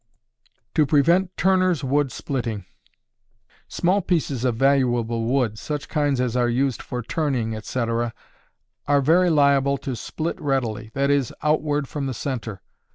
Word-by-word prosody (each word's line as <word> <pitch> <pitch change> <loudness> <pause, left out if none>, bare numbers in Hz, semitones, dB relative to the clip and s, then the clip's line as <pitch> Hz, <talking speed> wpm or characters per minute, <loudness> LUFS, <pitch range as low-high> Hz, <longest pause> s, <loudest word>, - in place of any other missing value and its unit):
To 155 -3 +3
Prevent 170 +6 +3
Turners' 185 -5 +2
Wood 135 0 +1
Splitting. 115 -8 -4 1.0
Small 185 +4 +1
pieces 155 -9 -1
of 125 -3 +1
valuable 120 -3 +1
wood, 120 -3 0
such 150 -2 -4
kinds 145 -4 +1
as 125 -2 0
are 120 -1 +2
used 130 +1 0
for 125 -2 -5
turning, 125 -7 -1
etc., 115 +1 -2 0.8
are 145 -1 +4
very 175 +6 +4
liable 140 -3 +3
to 135 -1 -5
split 160 +8 -4
readily 120 -6 -1
that 140 0 +2
is, 140 -4 +1
outward 150 -2 +1
from 140 0 -4
the 130 - -4
centre. 115 -7 -5
135 Hz, 140 wpm, -23 LUFS, 120-150 Hz, 1.0 s, are